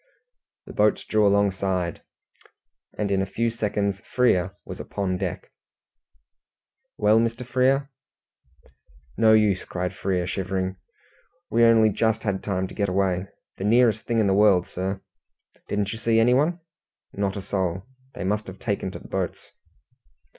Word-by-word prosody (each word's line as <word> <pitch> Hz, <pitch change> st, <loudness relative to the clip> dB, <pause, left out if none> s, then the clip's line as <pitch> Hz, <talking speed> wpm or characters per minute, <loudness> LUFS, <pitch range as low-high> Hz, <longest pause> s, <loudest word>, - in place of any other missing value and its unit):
The -, -, -10 dB
boats 105 Hz, 0 st, +2 dB
drew 110 Hz, -1 st, +3 dB
alongside, 95 Hz, -3 st, 0 dB, 1.0 s
and 105 Hz, -1 st, -1 dB
in 95 Hz, -1 st, +2 dB
a -, -, 0 dB
few 115 Hz, +4 st, -1 dB
seconds 105 Hz, -3 st, -1 dB
Frere 100 Hz, -5 st, +1 dB
was -, -, -8 dB
upon 95 Hz, -2 st, -2 dB
deck. 95 Hz, -3 st, -4 dB, 1.5 s
"Well, 105 Hz, +1 st, +4 dB
Mr. 115 Hz, +2 st, -1 dB
Frere?" 130 Hz, +3 st, +1 dB, 1.2 s
"No 110 Hz, -1 st, +5 dB
use," 105 Hz, -3 st, +3 dB
cried 90 Hz, 0 st, -4 dB
Frere, 90 Hz, -2 st, -1 dB
shivering. 95 Hz, 0 st, -2 dB, 0.7 s
"We 115 Hz, +1 st, +4 dB
only 115 Hz, -1 st, +6 dB
just 110 Hz, +2 st, 0 dB
had 100 Hz, -3 st, -1 dB
time 95 Hz, -2 st, -2 dB
to -, -, -10 dB
get 100 Hz, -2 st, -1 dB
away. 95 Hz, 0 st, 0 dB, 0.3 s
The -, -, -5 dB
nearest 115 Hz, 0 st, +3 dB
thing 115 Hz, -1 st, +1 dB
in 110 Hz, -, +3 dB
the 95 Hz, -, +3 dB
world, 100 Hz, -3 st, +4 dB
sir." 95 Hz, +1 st, -4 dB, 0.7 s
"Didn't 105 Hz, -1 st, -1 dB
you 110 Hz, -, -7 dB
see 115 Hz, -1 st, +2 dB
anyone?" 135 Hz, +9 st, +3 dB, 0.5 s
"Not 100 Hz, 0 st, -2 dB
a -, -, -4 dB
soul. 95 Hz, -2 st, -2 dB, 0.3 s
They -, -, -5 dB
must 105 Hz, +3 st, -1 dB
have 95 Hz, 0 st, -8 dB
taken 100 Hz, -2 st, -2 dB
to -, -, -6 dB
the -, -, -13 dB
boats." 95 Hz, -2 st, -4 dB
100 Hz, 145 wpm, -24 LUFS, 95-110 Hz, 1.5 s, only